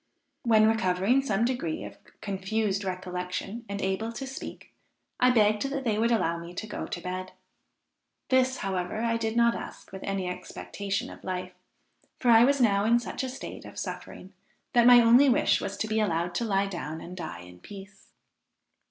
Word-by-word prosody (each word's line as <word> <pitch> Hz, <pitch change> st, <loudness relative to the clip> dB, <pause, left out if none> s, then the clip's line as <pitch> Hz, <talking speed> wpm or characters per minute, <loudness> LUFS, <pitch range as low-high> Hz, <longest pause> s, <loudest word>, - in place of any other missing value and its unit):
When 220 Hz, -5 st, +5 dB
recovering 220 Hz, +3 st, +2 dB
some 225 Hz, -4 st, +1 dB
degree 240 Hz, -11 st, -2 dB
of -, -, -10 dB, 0.2 s
confused 200 Hz, +1 st, -1 dB
recollection, 185 Hz, +4 st, -4 dB
and 200 Hz, 0 st, -3 dB
able 190 Hz, +4 st, -1 dB
to 270 Hz, -, -5 dB
speak, 265 Hz, 0 st, -8 dB, 0.5 s
I 250 Hz, -, +5 dB
begged 215 Hz, -3 st, +3 dB
that 275 Hz, -1 st, -3 dB
they 215 Hz, -4 st, 0 dB
would 230 Hz, +1 st, +3 dB
allow 170 Hz, -7 st, +1 dB
me 170 Hz, +1 st, -9 dB
to 215 Hz, -, -4 dB
go 215 Hz, -, -5 dB
to -, -, -5 dB
bed. 185 Hz, +1 st, -5 dB, 1.0 s
This, 260 Hz, 0 st, +3 dB
however, 190 Hz, +2 st, -2 dB
I 230 Hz, 0 st, +1 dB
did 225 Hz, 0 st, -2 dB
not 235 Hz, 0 st, +5 dB
ask -, -, -8 dB
with 190 Hz, 0 st, -8 dB
any 195 Hz, -2 st, -2 dB
expectation 195 Hz, +2 st, -4 dB
of -, -, -13 dB
life, 185 Hz, 0 st, -4 dB, 0.7 s
for 245 Hz, -, +3 dB
I 225 Hz, 0 st, +8 dB
was 280 Hz, +2 st, +3 dB
now 200 Hz, -5 st, +3 dB
in 230 Hz, +2 st, +4 dB
such 240 Hz, -, -4 dB
a 260 Hz, -, -2 dB
state 260 Hz, -, -8 dB
of -, -, -12 dB
suffering, 190 Hz, +2 st, -7 dB, 0.4 s
that 240 Hz, 0 st, +5 dB
my 245 Hz, -1 st, +9 dB
only 240 Hz, +4 st, +6 dB
wish 290 Hz, +5 st, +3 dB
was 200 Hz, 0 st, -4 dB
to 220 Hz, -, -2 dB
be 220 Hz, 0 st, 0 dB
allowed 175 Hz, -4 st, 0 dB
to 235 Hz, -, -1 dB
lie 195 Hz, -2 st, +1 dB
down 160 Hz, -5 st, -5 dB
and 180 Hz, +2 st, -9 dB
die 160 Hz, -, -6 dB
in 90 Hz, 0 st, -13 dB
peace. 195 Hz, -, -12 dB
205 Hz, 185 wpm, -28 LUFS, 185-235 Hz, 1.0 s, my